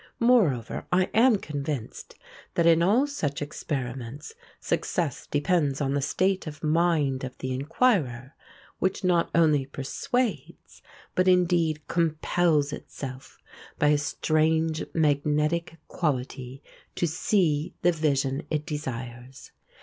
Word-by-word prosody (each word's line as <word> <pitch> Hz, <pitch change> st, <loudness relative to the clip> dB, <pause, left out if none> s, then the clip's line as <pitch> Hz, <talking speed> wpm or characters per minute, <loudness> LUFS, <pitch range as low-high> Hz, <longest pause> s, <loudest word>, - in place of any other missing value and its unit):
Moreover, 205 Hz, -, +2 dB
I 185 Hz, +1 st, +2 dB
am 230 Hz, 0 st, +5 dB
convinced 145 Hz, -, -5 dB, 0.4 s
that 170 Hz, -, +2 dB
in 165 Hz, 0 st, +5 dB
all 215 Hz, +10 st, +4 dB
such 160 Hz, -, -3 dB
experiments 135 Hz, -, -5 dB, 0.3 s
success 165 Hz, -8 st, -2 dB
depends 145 Hz, -2 st, +1 dB
on 140 Hz, -2 st, 0 dB
the 145 Hz, -, 0 dB
state 185 Hz, +5 st, 0 dB
of 155 Hz, +1 st, -8 dB
mind 155 Hz, -4 st, +1 dB
of 130 Hz, -1 st, -6 dB
the 130 Hz, 0 st, -3 dB
inquirer, 140 Hz, -, 0 dB, 0.5 s
which 190 Hz, +1 st, -1 dB
not 175 Hz, -2 st, +2 dB
only 150 Hz, -5 st, +3 dB
persuades, 170 Hz, -, -3 dB, 0.3 s
but 185 Hz, 0 st, +2 dB
indeed 170 Hz, -4 st, +2 dB
compels 160 Hz, -2 st, +1 dB
itself 130 Hz, -1 st, -8 dB, 0.4 s
by 150 Hz, -, +3 dB
a 150 Hz, -, +4 dB
strange 155 Hz, +2 st, +1 dB
magnetic 150 Hz, +2 st, +1 dB
quality 130 Hz, -3 st, -3 dB, 0.3 s
to -, -, 0 dB
see 160 Hz, -2 st, 0 dB
the 175 Hz, -, +5 dB
vision 140 Hz, -4 st, 0 dB
it 150 Hz, -1 st, -2 dB
desires. 130 Hz, -3 st, -6 dB
155 Hz, 115 wpm, -26 LUFS, 140-175 Hz, 0.5 s, am